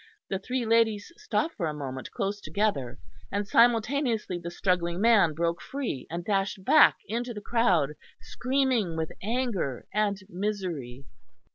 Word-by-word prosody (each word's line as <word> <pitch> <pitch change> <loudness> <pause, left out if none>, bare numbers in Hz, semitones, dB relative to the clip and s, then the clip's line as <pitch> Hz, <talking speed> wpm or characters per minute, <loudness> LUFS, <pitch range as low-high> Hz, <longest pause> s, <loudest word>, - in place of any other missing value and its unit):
The 195 - -1
three 250 +4 -2
ladies 225 +1 +2
stopped 380 -6 -1
for 170 -6 -2
a 150 - -3
moment, 130 -3 -6
close 200 +1 -3
together; 200 - -1 0.3
and 205 0 -1
simultaneously 230 -3 +2
the 170 0 -6
struggling 175 -1 0
man 210 -7 +5
broke 170 +1 -1
free 265 - -4
and 170 +1 -5
dashed 195 -1 -1
back 310 - +7
into 235 +3 -3
the - - -4
crowd, 195 - +2 0.3
screaming 255 -9 0
with 160 -1 -2
anger 220 - -2
and 205 -1 +1
misery. 175 - -4
205 Hz, 140 wpm, -28 LUFS, 170-230 Hz, 0.3 s, back